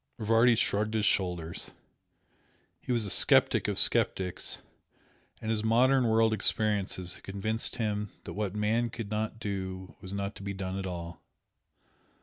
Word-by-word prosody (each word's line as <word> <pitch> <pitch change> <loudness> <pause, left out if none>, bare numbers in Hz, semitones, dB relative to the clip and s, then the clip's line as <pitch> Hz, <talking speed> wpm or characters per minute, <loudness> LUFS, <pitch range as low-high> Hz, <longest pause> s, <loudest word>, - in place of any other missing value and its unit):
Rivardi 115 +2 +4
shrugged 110 0 0
his 105 -1 +1
shoulders. 90 -4 -1 1.1
He - - -5
was 120 -3 +1
a 100 - 0
sceptic - - +5
of - - -1
sceptics 90 -2 +1 0.8
and 110 - -3
his 110 -1 0
modern 125 +3 +4
world 110 0 +3
experiences 100 -4 +1
had - - -13
convinced 110 +5 -3
him 105 -3 -2
that - - -7
what 105 -2 -3
man 110 +3 +1
could 110 -3 -7
not 110 +1 -2
do 95 -3 -5
was 95 - -8
not 100 +1 -3
to - - -10
be 100 0 -5
done 95 0 -4
at 95 - -4
all. 85 -2 -7
105 Hz, 150 wpm, -29 LUFS, 95-110 Hz, 1.1 s, sceptic